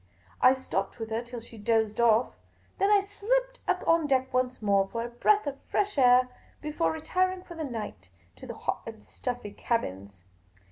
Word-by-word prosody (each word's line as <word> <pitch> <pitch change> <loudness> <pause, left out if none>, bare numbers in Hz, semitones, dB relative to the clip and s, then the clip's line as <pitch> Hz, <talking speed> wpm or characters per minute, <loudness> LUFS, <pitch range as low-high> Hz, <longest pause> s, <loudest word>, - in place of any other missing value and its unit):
I 255 +1 +7
stopped 195 -7 -3
with 225 -1 -6
her 225 +1 0
till 240 0 -8
she 230 -1 -12
dozed 220 0 +1
off; 230 +1 +4 0.5
then 395 - +3
I 410 -1 +6
slipped - - -1
up - - 0
on 330 -2 +4
deck 260 -1 +1
once 255 0 0
more 200 -2 +2
for 230 +3 -3
a - - -5
breath 410 - +2
of 280 -1 -5
fresh 410 0 -1
air, 250 -2 +6 0.3
before 305 +2 -1
retiring 365 +4 -1
for 350 - -10
the 325 -1 -5
night 225 - -6 0.3
to - - -10
the - - -6
hot - - -3
and 105 - -9
stuffy 245 - -5
cabins. 100 - -3
250 Hz, 185 wpm, -28 LUFS, 225-330 Hz, 0.5 s, I